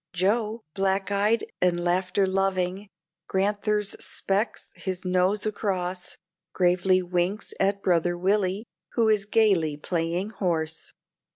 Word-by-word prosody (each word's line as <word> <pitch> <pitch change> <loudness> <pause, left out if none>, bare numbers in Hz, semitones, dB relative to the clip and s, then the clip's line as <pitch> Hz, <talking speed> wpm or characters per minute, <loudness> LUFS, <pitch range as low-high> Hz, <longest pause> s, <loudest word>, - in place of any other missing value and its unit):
Joe, 215 +4 0
black 195 +1 0
eyed 205 +3 +2 0.2
and 175 -1 +3
laughter 180 +2 +1
loving, 190 0 -1 0.4
Grand'ther's 205 +1 0
specs 200 +4 -2
his 185 -1 -4
nose 185 +3 +2
across, 185 -4 -2 0.4
Gravely 185 +1 +3
winks 180 +3 -1
at 200 +1 +1
brother 175 -1 +2
Willie, 195 +2 +1 0.3
who 230 -2 +3
is 210 -2 +2
gayly 195 -9 +3
playing 170 +5 -2
horse. 165 -5 -2
190 Hz, 110 wpm, -26 LUFS, 180-205 Hz, 0.4 s, and